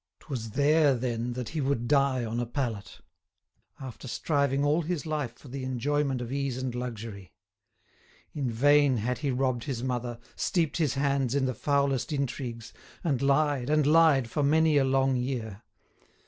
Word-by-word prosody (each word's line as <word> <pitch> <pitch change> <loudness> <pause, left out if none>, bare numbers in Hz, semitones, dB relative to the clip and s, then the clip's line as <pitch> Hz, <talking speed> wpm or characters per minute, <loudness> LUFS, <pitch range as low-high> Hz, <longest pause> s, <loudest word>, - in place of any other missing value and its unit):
'Twas 125 -7 -5
there, 145 0 +4
then, 120 -1 -2
that 125 -2 -5
he 160 - -3
would 130 -4 -1
die 140 -3 +2
on 115 +1 -3
a 120 - -1
pallet, 115 -7 -4 0.8
after 130 0 -8
striving 140 +1 0
all 150 +4 +2
his 165 -3 -3
life 150 -7 -3
for - - -15
the 130 +1 -6
enjoyment 130 +1 -1
of 120 0 -5
ease 140 -2 -2
and 130 -1 -3
luxury. 115 -6 -6 1.0
In 140 -4 -2
vain 145 +3 +4
had 125 +4 -2
he 145 - -1
robbed 130 -2 0
his 125 -5 -3
mother, 125 -2 -2 0.2
steeped 165 -4 0
his 155 -5 +1
hands 135 -2 0
in 140 -1 +2
the 130 - -1
foulest 140 +2 0
intrigues, 125 -5 -4 0.3
and 140 -7 0
lied 140 -1 +2
and 155 -1 +3
lied 150 -5 +5
for 145 - -2
many 155 +2 +3
a 140 - +4
long 135 0 +2
year. 120 -5 -4
135 Hz, 165 wpm, -28 LUFS, 120-145 Hz, 1.0 s, lied